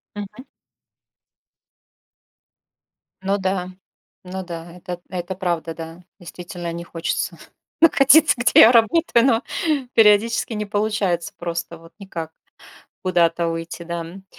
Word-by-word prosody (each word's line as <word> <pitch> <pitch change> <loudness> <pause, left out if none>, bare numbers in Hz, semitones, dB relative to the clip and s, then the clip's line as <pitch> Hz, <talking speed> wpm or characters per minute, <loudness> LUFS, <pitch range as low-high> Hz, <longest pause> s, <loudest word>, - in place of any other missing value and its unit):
Мгм. 205 +4 -8 2.8
Ну 195 +1 0
да, 185 -1 -2 0.5
ну 190 +1 -6
да, 170 -1 -8
это 180 -1 -7
это 180 0 -5
правда, 170 -3 -2
да, 165 +2 -10 0.2
действительно 175 0 -7
не 170 0 -6
хочется 165 -1 -3 0.4
находиться, 305 -1 +6
где 245 0 +5
я 225 - +9
работаю, 235 +1 +3
но 235 -2 +2 0.5
периодически 225 +2 +4
не 210 0 -3
получается 205 -4 -1
просто 170 0 -5
вот 165 +1 -17
никак 165 -5 -7 0.7
куда-то 170 -2 +1
уйти, 165 +1 -5
да, 170 0 -4
м. 190 +4 -11
180 Hz, 115 wpm, -21 LUFS, 170-210 Hz, 2.8 s, я